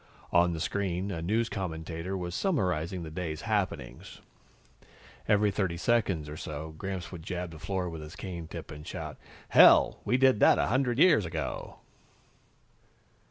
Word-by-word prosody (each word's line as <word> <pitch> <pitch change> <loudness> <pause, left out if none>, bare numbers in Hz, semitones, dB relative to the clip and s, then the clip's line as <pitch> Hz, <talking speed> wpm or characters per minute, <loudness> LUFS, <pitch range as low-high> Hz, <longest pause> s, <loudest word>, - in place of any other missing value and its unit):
On 85 0 +4
the 80 - -4
screen, 95 +2 -2
a 85 -3 -4
news 110 +7 +1
commentator 85 -1 -4
was 90 -1 -4
summarizing 90 - -1
the 80 - -7
day's 80 -2 -4
happenings. 95 - -3 1.1
Every 105 0 +3
thirty 95 -4 -1
seconds 95 -5 +1
or 75 +1 -7
so, 80 +1 -6
Gramps 95 +2 -5
would 90 -3 -8
jab 90 0 -4
the 80 - -11
floor 95 +1 -2
with 80 -2 -6
his 75 +1 -9
cane 85 -4 -6
tip - - -8
and 75 0 -9
shout, - - -6 0.3
"Hell, - - +7
we 125 - +2
did 130 -4 +4
that - - +6
a - - +2
hundred 125 0 +1
years 155 - +6
ago!" 80 -5 -5
90 Hz, 160 wpm, -29 LUFS, 80-100 Hz, 1.1 s, Hell